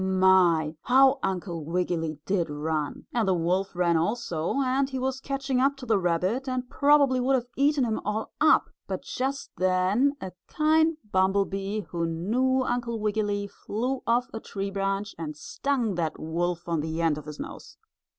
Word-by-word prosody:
My! 185 -4 +4
how 265 +2 +5
Uncle 175 -3 -3
Wiggily 165 -1 -1
did 185 -5 0
run. 150 0 -3
And 230 -4 +1
the 190 - +3
wolf 180 +3 0
ran 170 -2 +2
also, 170 -2 -1
and 265 +1 +1
he 265 - -4
was 265 +1 -2
catching 275 -2 -1
up 275 +2 +2
to 265 - -8
the 220 -4 +2
rabbit, 185 +9 0
and 255 -1 -2
probably 280 -1 +4
would 265 +2 +2
have 245 -2 -1
eaten 285 0 +3
him 225 -3 -1
all 210 +2 -3
up, 310 - +4 0.2
but - - -4
just 270 +2 -3
then 185 +9 +2
a 190 - -6 0.2
kind 315 +1 +2
bumble 190 +1 +3
bee 195 +2 -3
who 170 -1 -1
knew 245 +11 +1
Uncle 240 -2 -2
Wiggily 205 -1 -1
flew 245 +6 -3
off 240 +2 +2
a 225 - -4
tree 195 -2 -5
branch 195 +1 -2
and 155 -2 -5
stung 245 - -1
that 165 -3 -2
wolf 170 +2 -2
on 165 -2 0
the 160 +1 -3
end 160 -3 +1
of 150 - -12
his 150 -1 -8
nose. - - -9
200 Hz, 175 wpm, -27 LUFS, 175-255 Hz, 0.2 s, how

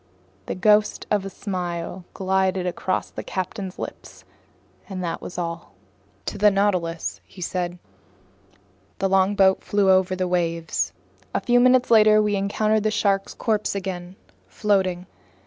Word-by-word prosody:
The - - -3
ghost 210 +2 +3
of 205 -2 +1
a - - -4
smile 180 -2 -4
glided 190 -1 +1
across 185 +1 -2
the - - -6
captain's 190 0 -5
lips, - - -8 0.7
and 185 -2 -4
that 165 -1 -3
was - - -8
all. 170 -1 -5 0.5
"To - - -4
the 210 +1 +6
Nautilus," 185 -5 -1
he - - -17
said. 180 0 -3 1.2
The 195 - +1
longboat 190 0 +3
flew 200 -2 +3
over 185 0 +3
the 185 0 -1
waves. 170 -2 -1 0.4
A - - +3
few 245 0 +3
minutes 250 0 +4
later 215 -1 +7
we 210 -1 +2
encountered 215 +2 +1
the 215 - +1
shark's 200 -2 0
corpse 215 -3 0
again, 185 -2 -5 0.3
floating. 185 - 0
190 Hz, 140 wpm, -23 LUFS, 180-205 Hz, 1.2 s, later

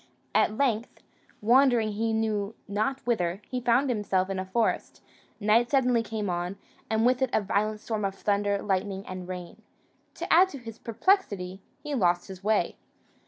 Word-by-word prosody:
At 215 - +2
length, 235 -4 -1 0.4
wandering 240 -1 +4
he 225 +2 -1
knew 220 -1 -1
not 215 +6 -1
whither, 185 -6 0
he 255 -1 -3
found 245 +4 +3
himself 200 -5 0
in 190 - -2
a 185 - -3
forest; 225 +3 -1 0.4
night 225 +3 +3
suddenly 250 -4 +3
came 220 -2 -4
on, 175 +2 -2 0.3
and 220 +1 +2
with 250 +1 +3
it 260 - +2
a - - +4
violent 210 +1 -1
storm 220 -2 -3
of 195 -1 -1
thunder, 200 0 0
lightning, 195 0 -1
and 185 -1 -6
rain: 180 -2 -7 0.5
to - - -1
add 365 +3 +7
to 285 - -8
his 230 -3 -10
perplexity, 210 - 0 0.2
he 295 -1 -4
lost 175 -7 +1
his 190 0 -9
way. 215 0 +1
215 Hz, 165 wpm, -27 LUFS, 195-240 Hz, 0.5 s, add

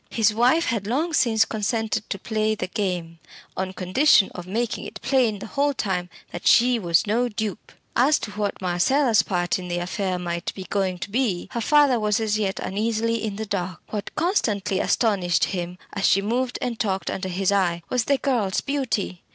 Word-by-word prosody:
His 220 -2 +2
wife 255 +9 +3
had 225 - -2
long 305 +9 0
since 225 -6 +3
consented 220 0 -2
to 200 - -2
play 215 +1 -1
the - - -3
game, 180 -5 -3 0.4
on 190 0 -2
condition 190 +4 +3
of 180 0 -8
making 230 +4 -2
it - - -8
plain 245 -6 +2
the - - -8
whole 285 +3 0
time 180 -5 -2 0.2
that 175 - -4
she 245 0 +5
was 170 -4 +2
no 235 +4 +1
dupe. 215 -1 -5 0.2
As 275 +5 +4
to 210 - -5
what 205 -2 -3
Marcella's 220 +7 +3
part 175 -1 -1
in 180 - -7
the 175 0 -2
affair 180 +1 -2
might 170 0 -4
be 190 - -6
going 190 -1 -1
to 190 +3 -7
be, 220 -7 -1
her 235 - -2
father 285 0 +4
was 210 +1 +1
as 215 -1 0
yet 195 -2 -1
uneasily 225 +2 -1
in 210 -2 -3
the 220 +2 -4
dark. 185 -4 -3
What 210 -2 -3
constantly 215 - 0
astonished 190 -7 +1
him, 180 -2 -2 0.2
as 195 -1 +1
she 195 - +3
moved 245 +4 -1
and 235 -2 -3
talked 195 -4 -1
under 190 0 -4
his 190 +2 0
eye, 175 -4 +1
was 245 -3 +1
the 280 - +2
girl's 235 -9 0
beauty. 255 -10 -2
210 Hz, 190 wpm, -24 LUFS, 185-235 Hz, 0.4 s, she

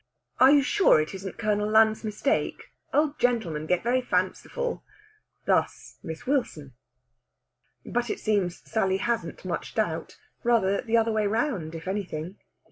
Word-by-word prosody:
"Are 260 - +8
you 285 -1 +5
sure 380 - +4
it 155 +4 -2
isn't 190 0 -7
Colonel 210 -1 0
Lund's 220 0 +4
mistake? 215 +5 -2 0.2
Old 300 0 +1
gentlemen 200 -11 0
get 180 +1 +1
very 250 +2 +2
fanciful." 245 - -2 0.6
Thus - - 0
Miss 160 -1 -7
Wilson. 200 - -1 1.1
But 240 0 -2
it - - -3
seems 195 -5 -1
Sally 190 -4 +1
hasn't 230 +3 -3
much - - -4
doubt. - - -2 0.3
Rather 220 -5 +2
the 230 -1 +1
other 225 0 +2
way 215 -1 +1
round, 205 - -1
if 165 +2 -8
anything! 185 -2 -4
215 Hz, 140 wpm, -26 LUFS, 185-240 Hz, 1.1 s, Are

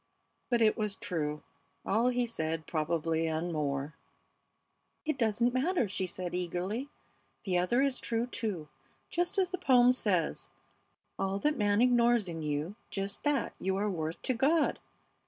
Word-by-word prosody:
"But 240 -2 +3
it 215 - +4
was 210 -2 -1
true, 150 -3 -3 0.4
all 225 +4 +2
he 245 -1 +2
said, 160 -7 -2
probably, 165 0 0
and 160 +2 -2
more 145 -1 -2 0.6
" - - -48
"It 310 -1 0
doesn't 235 0 +1
matter," 270 - +1
she 190 -1 -2
said, 180 0 -4
eagerly. 180 +9 -2 0.5
"The 180 -3 +1
other 240 +9 +2
is 275 -2 0
true, 230 0 0
too. 215 -10 -3 0.4
Just 350 +3 0
as 375 -2 +3
the 370 -1 -4
poem 250 -7 +6
says, 190 -10 0 0.7
'All 195 0 0
that 300 0 +2
man 205 -2 +2
ignores 240 -3 +4
in 165 -2 -5
you, 150 +4 -2 0.2
just 195 0 -3
that 290 -1 +1
you 190 +1 0
are 205 +1 0
worth 160 -2 -3
to 255 - +1
God!' 295 +7 +2
205 Hz, 155 wpm, -31 LUFS, 165-245 Hz, 0.7 s, poem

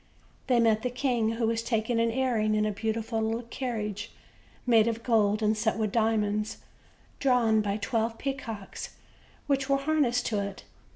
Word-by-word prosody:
They 250 -3 +4
met 220 -2 +3
the 250 - -1
king, 245 -3 0
who 230 0 0
was 225 0 0
taking 230 0 0
an 230 0 +3
airing 225 -3 +1
in 215 0 +2
a 215 - 0
beautiful 225 +2 -2
little 225 +2 -1
carriage 225 -4 -4 0.5
made 230 -3 +5
of 230 0 -2
gold 215 -3 +2
and 215 +1 +3
set 220 +1 0
with 215 -2 0
diamonds, 215 -2 +1 0.6
drawn 235 -5 +3
by 205 -1 -1
twelve 225 +2 -1
peacocks, 235 -7 -5 0.5
which 275 -1 0
were 275 - +4
harnessed 275 -4 +1
to 215 -3 0
it. 200 -1 -5
225 Hz, 165 wpm, -28 LUFS, 215-245 Hz, 0.6 s, made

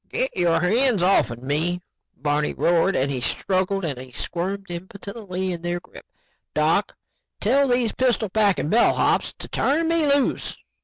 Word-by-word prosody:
"Get - - -2
your 175 -2 +2
hands 220 +2 +2
offn 125 -10 +2
me," 160 +6 0 0.4
Barney 145 +2 0
roared 175 +3 +2
as 130 - +1
he 130 -2 -3
struggled 190 +6 0
and 130 -4 -6
squirmed 195 +3 -3
impotently 190 +1 -5
in 170 -2 -5
their 175 0 -2
grip. - - -15 0.5
"Doc, - - +1 0.4
tell 275 +6 +3
these 245 -3 +1
pistol 245 -4 +1
packing 200 -6 +1
bellhops 235 - +2
to - - -8
turn 310 +5 +1
me 330 -2 +2
loose." 280 -1 +1
190 Hz, 145 wpm, -23 LUFS, 170-235 Hz, 0.5 s, tell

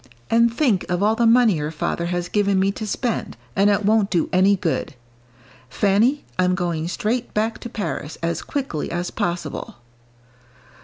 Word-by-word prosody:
And 235 +1 +4
think 230 - +1
of 180 +2 0
all 215 +1 +4
the 230 +1 +2
money 230 -5 +5
your 150 0 -2
father 165 +2 -2
has 175 0 -2
given 200 0 +1
me 195 +1 +2
to 215 +1 -6
spend, 235 +2 -2 0.2
and 200 +1 +4
it 205 0 +1
won't 210 -1 +3
do 175 -4 0
any 190 +2 +5
good. 165 -4 -2 0.7
Fanny, 215 - +2
I'm 180 0 +3
going 170 -3 -2
straight 230 +7 -2
back 220 +2 0
to 240 - -7
Paris, 200 -8 -4
as 170 -1 -1
quickly 265 - -3
as 175 +1 -3
possible." 170 -4 -3
200 Hz, 165 wpm, -22 LUFS, 175-225 Hz, 0.7 s, money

